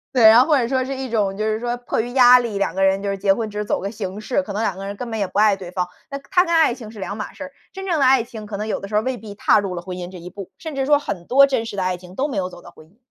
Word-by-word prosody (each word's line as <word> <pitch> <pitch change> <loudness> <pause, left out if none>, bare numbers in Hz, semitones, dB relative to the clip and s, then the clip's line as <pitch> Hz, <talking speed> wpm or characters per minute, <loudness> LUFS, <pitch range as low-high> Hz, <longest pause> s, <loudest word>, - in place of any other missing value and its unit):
对， 245 - +4
然 220 +2 +9
后 - - +3
或 305 -3 +4
者 240 -3 +1
说 260 +1 0
是 265 +2 -4
一 265 -1 -5
种， 205 -4 0
就 215 - -1
是 215 0 0
说 240 0 -2
迫 245 -2 -2
于 240 +2 -6
压 250 -1 +7
力， 230 -4 -3
2 200 - -1
个 195 - +1
人 195 0 +3
就 200 - -2
是 195 - -2
结 195 0 +3
婚 220 +1 -3
只 210 - -8
是 210 - -1
走 205 - -1
个 195 - -4
形 200 -2 -6
式， 245 +6 -1
可 215 - -7
能 205 +2 -2
2 195 -5 -1
个 195 - -6
人 200 - -4
根 245 +1 -6
本 225 - -3
也 205 - 0
不 195 - -2
爱 210 -1 +5
对 185 -2 -9
方， 180 -1 -2 0.2
那 275 - -4
它 360 - +4
跟 340 -2 -2
爱 320 -6 +4
情 230 -3 -10
是 220 - -12
两 200 +1 -4
码 215 - -6
事 285 - -8
儿。 275 - -11 0.2
真 385 0 -7
正 350 -4 0
的 275 - +3
爱 260 -1 +5
情， 225 -2 -9
可 205 -1 -6
能 210 +2 -4
有 - - -2
的 200 - -7
时 - - -11
候 - - +5
儿 - - -4
未 260 -1 -1
必 215 -3 -10
踏 210 - +3
入 195 -2 -3
了 175 - -5
婚 180 0 -7
姻 180 0 -7
这 185 - -9
一 175 +1 -9
步， 195 0 -10
甚 320 -3 -7
至 270 -1 -1
说 290 +1 +4
很 180 -11 -5
多 275 +2 +6
真 255 -4 -1
实 205 - -7
的 190 - 0
爱 185 0 0
情 180 0 -13
都 275 +6 0
没 275 - -5
有 185 -2 -1
走 175 -1 -13
到 175 - -13
婚 155 -2 -17
姻。 195 - -29
215 Hz, 405 characters per minute, -21 LUFS, 195-255 Hz, 0.2 s, 然